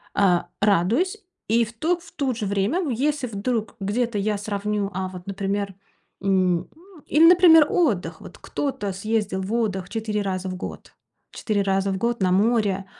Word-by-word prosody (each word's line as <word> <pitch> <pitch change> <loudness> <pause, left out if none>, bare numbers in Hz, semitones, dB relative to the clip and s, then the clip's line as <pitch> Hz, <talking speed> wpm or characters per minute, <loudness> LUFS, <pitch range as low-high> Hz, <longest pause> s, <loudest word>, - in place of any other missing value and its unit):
Э, 185 -4 +4 0.2
радуюсь. 225 - +2 0.2
И 230 +2 +3
в 230 - -10
ту 320 +10 0
в 350 - -16
то 270 -3 -1
же 220 -2 -4
время, 200 - 0
ну, 330 - -2
если 270 +2 0
вдруг 225 +1 -3
где-то 215 +3 -1
я 210 +1 0
сравню, 205 0 -2
а 190 0 -2
вот, 180 0 -10
например, 195 0 -2 0.5
м, 185 -3 +1 0.4
или, 310 +3 +5
например, 335 -3 +7
отдых. 250 - 0
Вот - - -12
кто-то 210 -9 -3
съездил 205 -1 -1
в 190 +4 -4
отдых 195 -6 -1
4 215 -2 -2
раза 190 -1 -3
в 185 - -4
год. 180 - -8 0.4
4 210 -2 -1
раза 195 0 +1
в 190 - -2
год 235 +2 -1
на 185 -1 +2
море, 200 -1 +2
205 Hz, 170 wpm, -23 LUFS, 195-240 Hz, 0.5 s, например